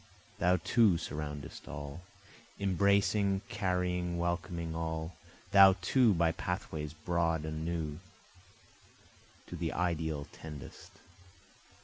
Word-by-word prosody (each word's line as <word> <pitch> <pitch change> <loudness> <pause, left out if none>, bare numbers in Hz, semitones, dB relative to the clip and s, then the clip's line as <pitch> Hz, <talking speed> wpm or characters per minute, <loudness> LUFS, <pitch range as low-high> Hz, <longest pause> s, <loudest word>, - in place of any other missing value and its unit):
Thou 90 +2 +4
too 115 -6 +5
surroundest 75 -3 -6
all, 70 +1 -7 0.6
Embracing 100 +1 +2
carrying 90 -3 -1
welcoming 85 -1 -2
all, 80 0 -3 0.4
thou 95 -1 +9
too 110 +3 +4
by 85 -1 +3
pathways 80 -4 -4
broad 80 -1 0
and 80 0 -4
new, 80 -2 -3 1.5
To - - -8
the - - -2
ideal 80 -4 -1
tendest. 75 -3 -10
85 Hz, 95 wpm, -32 LUFS, 80-90 Hz, 1.5 s, thou